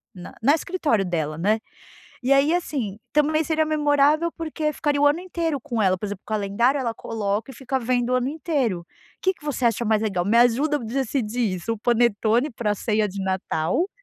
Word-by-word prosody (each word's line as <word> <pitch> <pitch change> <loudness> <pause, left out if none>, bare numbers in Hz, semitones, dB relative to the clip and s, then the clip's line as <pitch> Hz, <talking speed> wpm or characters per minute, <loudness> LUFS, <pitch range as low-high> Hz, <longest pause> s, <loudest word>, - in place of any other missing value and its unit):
na 180 -1 -10
na 275 +6 +5
escritório 310 - 0
dela, 160 -4 -2
né. 210 +6 +1 0.6
E 250 - -1
aí, 275 +3 +5
assim, 260 - -2
também 305 +1 +2
seria 315 0 +1
memorável, 300 +1 +2
porque 315 -1 -2
ficaria 290 -1 0
o 290 - +5
ano 295 +4 +3
inteiro 335 -5 -2
com 240 -5 -3
ela, 190 -2 +3
por 185 - -7
exemplo, 200 -1 -6
o - - -61
calendário, 215 +6 +1
ela 240 -4 -1
coloca 215 +1 -3
e - - -11
fica 265 +2 -2
vendo 245 0 0
o 255 - +3
ano 255 +1 0
inteiro. 270 - -1 0.4
Que 375 - +3
que 355 - -26
você 285 -4 -2
acha 235 -1 +2
mais 220 -1 +2
legal? 195 -5 -1
Me 220 +3 +3
ajuda 245 +6 +4
a - - -2
decidir 240 -3 -1
isso? 185 +5 -3
O 225 - -5
panetone 235 +2 +2
para 225 -3 -1
a - - -1
ceia 215 0 0
de 200 +1 -7
Natal 190 - -1
245 Hz, 205 wpm, -23 LUFS, 210-295 Hz, 0.6 s, na